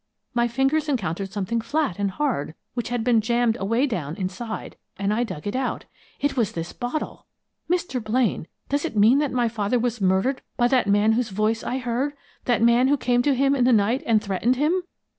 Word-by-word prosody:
My 240 0 +2
fingers 270 +6 +1
encountered 195 - -2
something 210 +3 -2
flat 285 - -1
and 200 -1 +1
hard 210 - -2 0.2
which 240 -2 -3
had 240 -2 -1
been 235 -2 +3
jammed 235 0 +1
away 230 +7 +1
down 165 - -3
inside, 195 +5 -5 0.2
and 200 +1 0
I 235 +3 +1
dug 155 -10 -6
it 205 - -3
out. 260 -1 -2 0.3
It 285 - 0
was 230 -6 0
this 165 0 -5
bottle! 245 +5 -4 0.4
Mr. 345 -9 -1
Blaine, 220 -6 0 0.2
does 285 +1 0
it 280 -10 -3
mean 225 +7 +6
that 295 -2 0
my 245 -2 +1
father 220 +1 0
was 240 -2 -1
murdered 190 +8 +2 0.2
by 240 - +4
that 255 -5 +2
man 205 +2 +4
whose 235 +1 0
voice 215 +3 0
I 255 - -2
heard 255 +3 -1 0.3
that 240 -2 +2
man 235 +2 +5
who 285 +1 +3
came 245 -2 +2
to 280 +1 +2
him 275 +2 +3
in 255 - +2
the 250 - +4
night 225 +3 +3
and 225 -2 +4
threatened 210 +5 +1
him?" 310 +7 +1
235 Hz, 205 wpm, -24 LUFS, 210-260 Hz, 0.4 s, mean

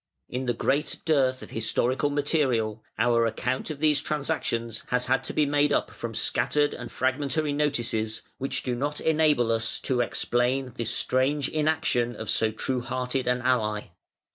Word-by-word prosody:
In 125 +1 -4
the 120 - +1
great 140 +5 0
dearth 130 -5 +2
of - - -11
historical 125 +5 0
material, 130 -7 0
our 115 0 +3
account 130 +5 -2
of 155 - -4
these 150 -2 +3
transactions 135 -8 -2
has 125 0 0
to 130 +1 0
be 150 - +2
made 145 0 +2
up - - +1
from 115 -1 -6
scattered 145 +6 +1
and - - -7
fragmentary 145 +3 0
notices, 120 -7 -1 0.2
which 135 - -1
do 125 - -1
not 145 +4 -2
enable 150 -7 +3
us 115 0 0
to 125 -2 +1
explain 125 +2 0
this 115 -1 -2
strange 135 +2 +1
inaction 150 -6 +1
of 110 - -3
so 110 - +2
true 125 +3 -2
hearted 130 +1 -2
an 125 0 +1
ally. 110 -5 +1
130 Hz, 160 wpm, -27 LUFS, 120-145 Hz, 0.2 s, our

